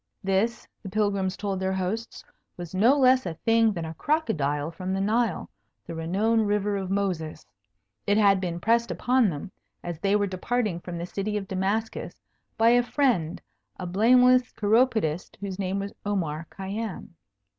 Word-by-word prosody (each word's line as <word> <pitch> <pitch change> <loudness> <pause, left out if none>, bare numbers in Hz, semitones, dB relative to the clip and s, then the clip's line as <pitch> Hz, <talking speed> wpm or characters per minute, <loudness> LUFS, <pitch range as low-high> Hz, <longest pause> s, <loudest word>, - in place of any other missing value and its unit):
This, 195 +5 0
the 195 - -7
Pilgrims 200 -2 0
told 200 -2 -2
their 190 0 -1
hosts, 190 +5 -4 0.3
was 175 -1 -8
no 230 +9 +4
less 255 -3 +4
a 165 - -4
thing 225 +4 +3
than 170 -5 -4
a 160 - -6
crocodile 160 - -1
from 185 +3 -4
the - - -1
Nile, 220 0 0 0.4
the 165 - -7
renowned 205 +7 +1
river 205 0 0
of 190 -2 -3
Moses. 185 -6 -2 0.6
It 205 +1 +3
had 200 -3 +4
been 175 -2 -3
pressed 230 +4 +2
upon 250 -3 +2
them, 170 +4 -6 0.3
as 175 -2 -5
they 195 +3 +2
were 205 -1 +2
departing 200 0 -1
from 175 0 -7
the 170 - -4
City 205 +3 -3
of 195 -2 -5
Damascus, 195 +4 -2 0.4
by 225 +1 +5
a 245 +1 +5
friend, 240 - 0 0.4
a 180 - -5
blameless 250 +7 +4
chiropodist, 215 -7 +1
whose 200 -1 -5
name 190 0 -1
was 200 +1 -4
Omar 165 -6 -2
Khayyam. 200 +1 -5
200 Hz, 165 wpm, -26 LUFS, 180-225 Hz, 0.6 s, by